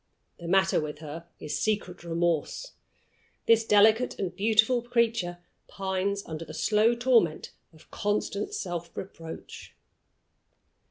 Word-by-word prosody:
The 170 Hz, -, -7 dB
matter 190 Hz, +1 st, +3 dB
with 150 Hz, -1 st, -5 dB
her 160 Hz, +2 st, -8 dB
is 150 Hz, -, -3 dB
secret 200 Hz, -5 st, -2 dB
remorse. 170 Hz, -, -1 dB, 0.7 s
This 225 Hz, 0 st, +5 dB
delicate 220 Hz, +3 st, +4 dB
and 185 Hz, -3 st, -3 dB
beautiful 220 Hz, +4 st, +3 dB
creature 230 Hz, -7 st, 0 dB, 0.3 s
pines 195 Hz, +1 st, -2 dB
under 160 Hz, 0 st, -6 dB
the -, -, -9 dB
slow 220 Hz, +2 st, +3 dB
torment 235 Hz, -10 st, +2 dB, 0.2 s
of 160 Hz, -1 st, -21 dB
constant 205 Hz, 0 st, -2 dB
self 175 Hz, -2 st, -4 dB
reproach. 165 Hz, -4 st, -9 dB
195 Hz, 115 wpm, -28 LUFS, 170-220 Hz, 0.7 s, This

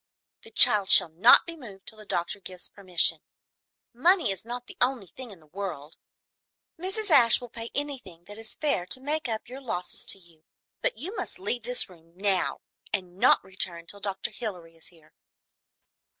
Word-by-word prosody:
The 450 Hz, -, -14 dB
child 215 Hz, -, +6 dB
shall -, -, +8 dB
not 180 Hz, +10 st, +6 dB
be 335 Hz, -, -4 dB
moved 210 Hz, -10 st, -13 dB
till 220 Hz, -, -4 dB
the 215 Hz, -, -13 dB
doctor 175 Hz, +3 st, -2 dB
gives 185 Hz, -1 st, -8 dB
permission. 185 Hz, -3 st, +2 dB, 0.7 s
Money 340 Hz, -, +3 dB
is 195 Hz, -, -5 dB
not 245 Hz, +2 st, -7 dB
the -, -, -10 dB
only 245 Hz, -4 st, +1 dB
thing 250 Hz, +7 st, -10 dB
in 195 Hz, -5 st, -13 dB
the 155 Hz, -, -22 dB
world! 160 Hz, -3 st, -7 dB, 0.8 s
Mrs. 385 Hz, +3 st, -2 dB
Ashe 240 Hz, -6 st, +7 dB
will 245 Hz, -2 st, -11 dB
pay 230 Hz, -1 st, -6 dB
anything 255 Hz, -, -5 dB
that 205 Hz, +4 st, -11 dB
is 225 Hz, 0 st, -3 dB
fair 280 Hz, -, 0 dB
to 255 Hz, -, +2 dB
make 295 Hz, 0 st, -2 dB
up 220 Hz, -1 st, -4 dB
your 260 Hz, +3 st, -9 dB
losses 180 Hz, -9 st, -4 dB
to -, -, 0 dB
you, 170 Hz, -4 st, -21 dB, 0.4 s
but -, -, -1 dB
you 355 Hz, -, -6 dB
must -, -, -3 dB
leave 245 Hz, -10 st, -3 dB
this 245 Hz, +2 st, -1 dB
room 165 Hz, -2 st, -20 dB
now, 195 Hz, -2 st, 0 dB, 0.3 s
and 185 Hz, -3 st, -4 dB
not 245 Hz, -, +5 dB
return 180 Hz, -3 st, -3 dB
till 200 Hz, +4 st, -7 dB
Dr. 200 Hz, +3 st, -3 dB
Hilary 180 Hz, -8 st, -7 dB
is 165 Hz, -, -10 dB
here." 160 Hz, -3 st, -21 dB
205 Hz, 185 wpm, -27 LUFS, 180-250 Hz, 0.8 s, shall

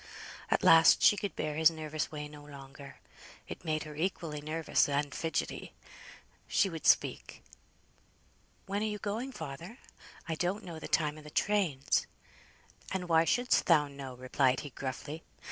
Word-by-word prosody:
At -, -, +1 dB
last 165 Hz, 0 st, +7 dB
she -, -, +7 dB
could 200 Hz, -4 st, -4 dB
bear 155 Hz, 0 st, -2 dB
his 160 Hz, 0 st, +6 dB
nervous 155 Hz, -2 st, -4 dB
way 150 Hz, -1 st, -5 dB
no 150 Hz, 0 st, -12 dB
longer, 140 Hz, -1 st, -11 dB, 0.5 s
it -, -, -8 dB
made 155 Hz, -2 st, -1 dB
her 155 Hz, -, -9 dB
equally 160 Hz, -2 st, -3 dB
nervous 155 Hz, 0 st, +1 dB
and 140 Hz, -1 st, -1 dB
fidgetty. 165 Hz, -1 st, -3 dB, 0.7 s
She 195 Hz, -, +2 dB
would 160 Hz, -1 st, -4 dB
speak. -, -, +2 dB, 1.2 s
"When 200 Hz, +1 st, -2 dB
are -, -, 0 dB
you 210 Hz, -1 st, -3 dB
going, 220 Hz, +6 st, -3 dB
father? 165 Hz, -, -8 dB, 0.5 s
I 165 Hz, -, -1 dB
don't 180 Hz, +6 st, -2 dB
know 170 Hz, -3 st, -7 dB
the -, -, -7 dB
time 155 Hz, -1 st, 0 dB
o' -, -, -12 dB
the 150 Hz, -, -11 dB
trains." 175 Hz, -7 st, +1 dB, 0.8 s
"And 185 Hz, -2 st, -3 dB
why 165 Hz, 0 st, +5 dB
shouldst 245 Hz, +7 st, +2 dB
thou 150 Hz, -4 st, +5 dB
know?" 140 Hz, -2 st, -8 dB
replied 130 Hz, +1 st, +1 dB
he, 145 Hz, -, -8 dB
gruffly. 140 Hz, +5 st, -6 dB
155 Hz, 160 wpm, -31 LUFS, 145-180 Hz, 1.2 s, last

